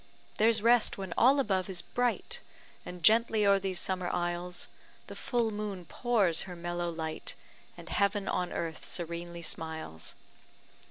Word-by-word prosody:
There's 220 0 +4
rest 235 -1 +4
when 190 -3 -5
all 270 +4 +5
above 195 -7 0
is 185 -2 -3
bright, 245 - -1 0.5
And 180 -1 -8
gently 220 +2 +5
o'er 200 0 +5
these 190 -2 -1
summer 185 -1 -1
isles 175 +1 -1 0.4
The - - -9
full 235 -3 0
moon 205 -4 -4
pours 200 -7 +1
her 180 - -6
mellow 175 0 -3
light, 160 -1 -4 0.4
And - - -11
heaven 200 0 +1
on 180 -1 -1
earth 165 -1 -4
serenely 170 0 -4
smiles. 160 - -3
185 Hz, 145 wpm, -31 LUFS, 175-215 Hz, 0.5 s, all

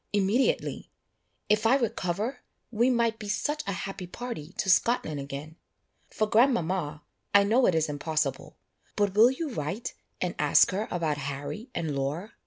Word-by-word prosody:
immediately! 205 +6 +1 0.6
If 215 +1 +3
I 250 - +5
recover, 220 -1 -1 0.3
we 235 +2 +3
might 235 -2 +1
be 210 -2 -6
such 295 +9 -1
a - - 0
happy 195 -2 -6
party 180 -6 -6
to - - -1
Scotland 185 -5 +2
again. 140 +3 -7 0.5
For 215 - 0
grandmama, 185 - +1 0.3
I 200 - +8
know 235 +5 +3
it 175 - +2
is 160 -1 +2
impossible; 155 +2 -2 0.4
but 205 -2 +1
will 220 +4 +7
you 285 +3 -3
write 190 - -4 0.3
and - - -1
ask - - +5
her 205 +4 -2
about 160 -4 -1
Harry 145 - -5
and 155 -4 -2
Laura? 145 +9 -3
200 Hz, 155 wpm, -28 LUFS, 155-230 Hz, 0.6 s, I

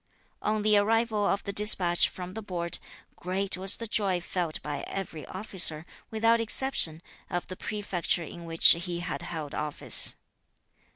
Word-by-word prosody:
On 215 0 -2
the 210 -1 +3
arrival 220 0 +1
of 200 - -1
the 200 - -6
despatch 190 -4 +3
from 180 0 -9
the 220 - -6
Board, 175 -4 -5 0.4
great 190 +2 -3
was 190 +2 +1
the 230 - -6
joy 200 -4 0
felt 175 -2 -3
by 145 - -5
every 175 -5 -7
officer, 185 -5 +2 0.2
without 230 +1 +1
exception, 215 -9 +3 0.3
of 175 - -4
the 185 - -6
prefecture 195 -4 -3
in 170 +1 -10
which 165 0 +6
he 170 0 +1
had 170 -2 -4
held 160 -4 -7
office. 150 -1 +3
185 Hz, 155 wpm, -27 LUFS, 170-210 Hz, 0.4 s, which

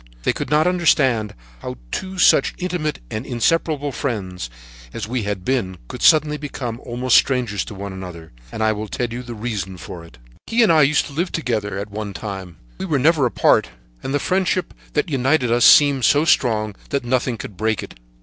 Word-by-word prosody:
They - - +2
could - - -5
not 150 +1 +3
understand 140 - +2 0.2
how - - -6 0.2
two 190 0 -4
such - - +4
intimate 175 -4 -2
and 110 - -3
inseparable 145 +4 0
friends, 95 - -4 0.4
as 110 -2 -5
we 125 +1 -2
had 100 -3 -3
been, 100 -9 -1
could - - -8
suddenly 150 -1 +5
become 125 -5 -5
almost 125 +1 0
strangers 120 -7 +1
to 105 - -9
one 100 0 -6
another, 90 -4 -9 0.2
and 110 - -3
I 110 - +3
will 105 0 -4
tell 120 - -2
you 125 - -4
the 120 -1 -8
reason 105 -4 -4
of 90 - -11
it. 75 -7 -16 0.3
"He 230 +1 +3
and 205 - +5
I 160 -1 +5
used 150 +1 +3
to 145 - -10
live 175 +5 -1
together 110 - -2
at 100 +1 -5
one 105 -1 -5
time. 95 -5 -6 0.2
We - - -3
were 155 -6 +1
never 145 0 +3
apart, - - +3 0.3
and - - -4
the 145 - +2
friendship 185 +3 0 0.2
that 150 - +1
united 135 -3 +1
us 120 0 +4
seemed 140 -3 +6
so 145 +5 +4
strong 110 -8 +2
that 140 -3 -2
nothing 125 -1 0
could 105 - -8
break 110 +2 -1
it. - - -10
125 Hz, 200 wpm, -21 LUFS, 105-150 Hz, 0.4 s, seemed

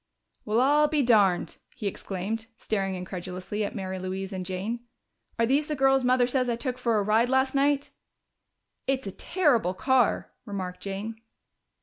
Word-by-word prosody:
"Well, 215 +2 +2
I'll 295 +3 +5
be 295 -2 +1
darned!" 205 -7 +3 0.2
he 235 - -7
exclaimed, 200 +3 -3
staring 195 -3 -1
incredulously 185 +3 -4
at 205 - -4
Mary 190 -2 -4
Louise 190 +1 -4
and 185 -1 -3
Jane. 190 +6 -3 0.6
"Are 230 - +3
these 280 +5 +2
the 300 - -1
girls 270 -1 +3
Mother 250 0 +4
says 255 0 0
I 235 - +1
took 250 +1 -3
for 235 -3 +2
a 205 - +2
ride 220 +4 +3
last 265 0 +2
night?" 280 0 +2 1.0
"It's 265 0 0
a 195 - -3
terrible 240 - +1
car," 260 +3 +2
remarked 190 -4 -5
Jane. 210 +3 -5
225 Hz, 160 wpm, -27 LUFS, 195-260 Hz, 1.0 s, I'll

